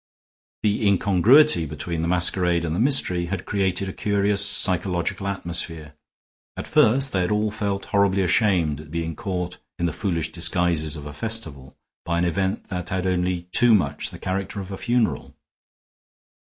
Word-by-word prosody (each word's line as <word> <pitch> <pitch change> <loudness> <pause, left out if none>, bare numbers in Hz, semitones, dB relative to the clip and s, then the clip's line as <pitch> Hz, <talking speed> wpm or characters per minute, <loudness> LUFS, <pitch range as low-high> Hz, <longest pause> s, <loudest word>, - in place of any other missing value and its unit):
The 105 0 +1
incongruity 100 - +4
between 85 +3 -4
the 85 - -1
masquerade 90 -1 +2
and 80 0 -2
the - - -2
mystery 110 -9 +1
had 90 0 -5
created 95 -1 -1
a 95 - -5
curious 100 -1 +1
psychological 95 -2 +2
atmosphere. 85 -5 -4 0.6
At - - -5
first 135 +5 +3
they 95 - +1
had 90 - -1
all 105 0 0
felt 100 -2 -3
horribly 100 -2 +1
ashamed 90 -6 +1
at 75 - -14
being 80 0 -4
caught 90 -5 -4 0.2
in 85 - -1
the 85 - -1
foolish 85 -5 -2
disguises 85 -3 0
of 75 -2 -9
a 75 - -8
festival, 75 - -3 0.3
by 85 0 -2
an 85 - +1
event 95 +4 -1
that 90 -2 -5
had 95 -1 -2
only 90 -1 -1
too 120 +2 +5
much 75 -7 -1
the - - -10
character 95 +2 -4
of 95 0 -7
a - - -4
funeral. 120 0 -1
90 Hz, 165 wpm, -23 LUFS, 85-100 Hz, 0.6 s, too